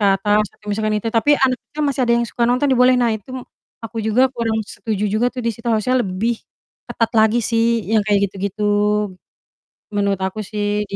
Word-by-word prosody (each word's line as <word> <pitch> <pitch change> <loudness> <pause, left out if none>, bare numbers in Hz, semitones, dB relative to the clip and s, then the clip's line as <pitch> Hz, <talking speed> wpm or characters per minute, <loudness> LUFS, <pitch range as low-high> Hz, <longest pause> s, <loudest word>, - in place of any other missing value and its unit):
ke 205 - +3
atas 205 +2 +2
atau 210 - -24
misalkan 215 +1 0
itu, 225 +2 -2
tapi 235 +6 +3
anaknya 265 +3 -1
masih 280 -1 -1
ada 235 - +3
yang 235 - +1
suka 235 +1 -1
nonton 255 +3 +2
dibolehin. 250 0 +4
Nah, 230 -2 +2
itu 220 +2 -6
m 255 - -6 0.4
aku 225 +1 -8
juga 250 +5 +3
kurang 225 -2 -1
setuju 210 -1 -4
juga 215 +4 +1
tuh 255 - -5
di - - +1
situ, 230 +3 -15
harusnya 235 +3 +2
lebih 205 +6 -1 0.5
ketat 230 -1 -1
lagi 220 +2 +4
sih 230 +1 +1
yang 220 - +4
kayak 200 -2 +2
gitu-gitu, 200 +2 -4 1.1
gitu. - - -80
Menurut 200 -1 0
aku 190 +3 -3
sih 210 0 -1
di - - -2
220 Hz, 205 wpm, -19 LUFS, 210-240 Hz, 1.1 s, dibolehin